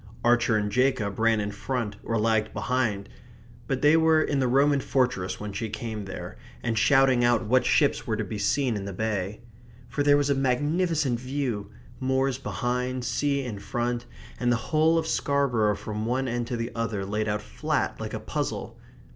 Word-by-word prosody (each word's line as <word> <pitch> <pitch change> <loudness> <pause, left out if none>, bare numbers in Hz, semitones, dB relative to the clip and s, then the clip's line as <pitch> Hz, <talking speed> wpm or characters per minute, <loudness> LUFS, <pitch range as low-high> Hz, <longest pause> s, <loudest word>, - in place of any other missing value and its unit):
Archer 120 -2 +4
and 105 -1 -1
Jacob 125 -5 +1
ran 115 -1 +3
in 105 0 -2
front 110 0 -3
or 115 - -1
lagged 110 0 +1
behind; 115 -6 -1 0.6
but 135 0 -2
they 150 +2 +6
were 160 -1 +5
in 145 -3 +1
the 130 - +2
Roman 140 +3 +3
fortress 125 -9 0
when 105 -1 -5
she 110 +3 -3
came 110 -2 -5
there, 95 0 -7 0.3
and 115 -1 0
shouting 130 +2 +4
out 120 -1 +3
what 125 +4 +3
ships - - +2
were - - 0
to - - -1
be 105 - -5
seen 125 +4 +1
in 100 -1 -4
the 100 - -5
bay. 105 0 -2 0.5
For 145 - -2
there 145 0 +5
was 145 -1 +1
a - - +5
magnificent 145 +1 +1
view 125 -6 -3 0.3
moors 130 0 0
behind, 125 -1 -2
sea 140 +2 0
in 110 -6 -5
front, 120 +3 -2 0.3
and 125 -1 +2
the - - +4 0.2
whole 160 +1 +4
of 165 - 0
Scarborough 125 -9 +1
from 105 +1 -4
one 130 +2 0
end 120 -1 -2
to 120 - -3
the 115 +1 -3
other 115 -4 -2
laid 105 +2 -1
out 105 0 -2
flat - - -2
like - - -4
a - - -3
puzzle. - - -4
120 Hz, 190 wpm, -26 LUFS, 105-135 Hz, 0.6 s, they